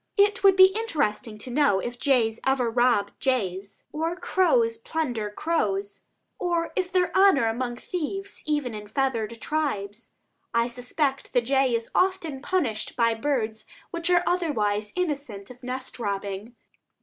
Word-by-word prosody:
It 405 0 +3
would 390 -1 +7
be 380 0 +7
interesting 260 - -1
to 245 +4 -7
know 255 -7 +3
if 240 +4 -5
jays 235 -5 +2
ever 265 -3 +1
rob 240 -4 +2
jays, 200 -7 -2
or 325 +3 -2
crows 455 +6 +2
plunder 310 - -2
crows; 205 -7 -2 0.3
or 340 -2 0
is 370 -1 0
there 365 -1 +1
honor 380 -10 +5
among 240 +2 -1
thieves 370 +8 -5
even 295 -6 0
in 210 -1 -7
the - - -17
feathered 230 -3 -1
tribes? 235 -9 -3 0.4
I 235 +1 +2
suspect 265 +3 -2
the 245 - +4
jay 265 0 +2
is 230 0 -3
often 365 -7 0
punished 285 -10 -1
by 230 -2 +3
birds 225 -3 -2 0.3
which 340 0 -2
are 350 -1 +4
otherwise 215 - 0
innocent 280 - -3
of 250 0 -14
nest 255 0 -6
robbing. 200 +1 -4
255 Hz, 150 wpm, -26 LUFS, 225-335 Hz, 0.4 s, would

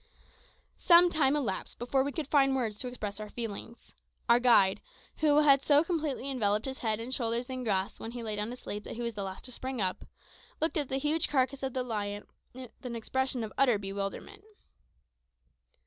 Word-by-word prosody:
Some 350 0 +6
time 290 -3 +3
elapsed 225 -11 -3
before 265 +3 +1
we 285 - -2
could 300 -1 -4
find 270 -2 +3
words 225 -5 -2
to 255 - -3
express 215 -5 -5
our 210 0 -6
feelings. 230 +1 -7 0.3
Our 235 +1 +6
guide, 230 -6 +4 0.4
who 300 -1 +4
had 275 -2 +6
so 290 +1 +5
completely 310 -6 -2
enveloped 215 -6 0
his 265 0 -5
head 220 -2 0
and 240 +3 -5
shoulders 240 0 0
in 255 -1 -4
grass 195 -4 -1
when 225 - -6
he 240 -1 -6
lay 215 -2 -2
down 210 +1 -2
to 245 - -5
sleep 210 -4 -6
that - - -6
he 240 - -4
was 235 -1 -2
the 205 - -5
last 190 -1 -6
to 255 - -9
spring 255 +1 -5
up, 185 -2 -1 0.6
looked 325 +1 0
at 290 -4 0
the 265 - 0
huge 300 +3 0
carcass 265 -1 +1
of 265 -2 -3
the 255 - -1
lion 205 -3 -4 0.3
with 255 -2 -10
an 245 -2 -5
expression 260 +2 -1
of 215 - -6
utter 250 -5 +4
bewilderment. 200 - -5
250 Hz, 200 wpm, -30 LUFS, 215-275 Hz, 0.6 s, Some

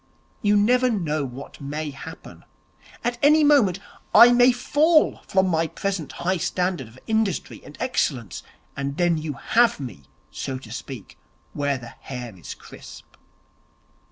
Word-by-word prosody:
You 205 0 +3
never 250 +5 +3
know 155 -9 -1
what 135 +2 -9
may 150 +2 -4
happen. 140 - -11 0.6
At 240 0 -2
any 300 +2 +5
moment 270 - +4 0.4
I 240 +1 +10
may 245 +1 +6
fall 300 +6 +2
from 190 0 +2
my 165 -2 +1
present 190 -5 -3
high 185 +1 +2
standard 180 -6 -1
of 115 +3 -17
industry 220 -4 -1
and 145 - -13
excellence; 135 - -1 0.3
and 140 0 -4
then 175 -2 +2
you 155 -1 -4
have 230 - +2
me, 120 - -8 0.3
so 135 -1 -4
to 120 -4 -12
speak, 120 -2 -8 0.3
where 140 -1 -1
the 120 -2 -11
hair 125 -5 -7
is 90 - -9
crisp.' - - -13
170 Hz, 145 wpm, -23 LUFS, -, 0.6 s, I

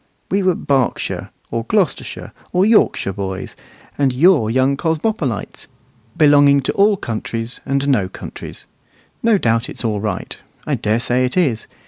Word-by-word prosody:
We 195 +2 +2
were 185 -2 +2
Berkshire, 135 -5 -1 0.2
or 115 - -2
Gloucestershire, 195 - -1 0.2
or 180 +2 +3
Yorkshire 210 - +3
boys; 95 0 -5 0.4
and 140 -2 +3
you're 140 - +4
young 130 +3 +2
cosmopolites, 160 - -2 0.5
belonging 145 -2 +5
to 130 - -2
all 200 0 +3
countries 115 -2 -5
and 140 0 0
no 105 -10 +2
countries. - - -8 0.6
No 230 -2 +4
doubt 115 -6 0
it's - - -5
all 105 -2 0
right; 100 -3 -4 0.3
I - - -1
dare 110 +2 0
say 125 +1 +1
it 125 +7 -1
is. 130 -11 +1
135 Hz, 145 wpm, -19 LUFS, 115-170 Hz, 0.6 s, belonging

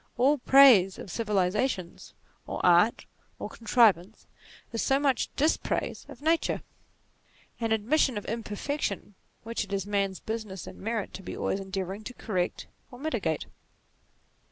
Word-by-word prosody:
All 275 +4 +3
praise 245 -9 +7
of 185 - -8
Civilization, 205 -2 -1 0.5
or - - -4
Art, 180 +5 +4 0.3
or - - -6
Contrivance, 220 -4 +2 0.5
is 230 - -1
so 270 0 +2
much 275 -4 +1
dispraise 305 +3 -1
of - - -12
Nature; 325 +1 +1 1.0
an 225 -1 -1
admission 235 +3 +2
of 205 - -5
imperfection, 225 0 -3 0.3
which 230 0 -2
it 200 - -12
is 195 -1 -1
man's 200 -2 -1
business, 220 -5 -5
and - - -10
merit, 220 0 -3
to - - -7
be - - -7
always 195 - -1
endeavouring 195 +1 -5
to 250 - -7
correct 185 -5 -2 0.2
or 245 - -12
mitigate. 235 - -2
220 Hz, 135 wpm, -28 LUFS, 195-250 Hz, 1.0 s, praise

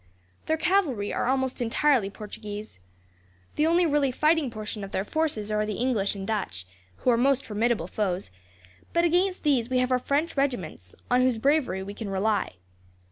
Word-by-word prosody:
Their 315 - +2
cavalry 310 - +1
are - - -1
almost 260 -1 0
entirely 240 -2 +2
Portuguese. 210 - -8 0.8
The 305 - +2
only 345 +2 +4
really 290 -3 +2
fighting 305 +2 +2
portion 215 -2 -6
of 195 - -6
their 195 0 -2
forces 255 -8 -1
are 210 0 +1
the 210 -1 -3
English 225 -5 0
and 195 -1 -5
Dutch, 190 - -3 0.3
who 250 - +1
are 235 - +3
most 275 +2 +2
formidable 220 -3 0
foes; 185 - -2 0.6
but 340 0 +3
against 360 +2 +1
these 260 -6 +2
we 255 - +1
have 255 0 +1
our 255 - +3
French 290 +6 0
regiments, 190 - -2 0.2
on 250 +1 +5
whose 255 -2 +2
bravery 265 -6 +1
we 200 +1 -7
can 210 -1 -6
rely. 200 - 0
240 Hz, 175 wpm, -26 LUFS, 205-285 Hz, 0.8 s, on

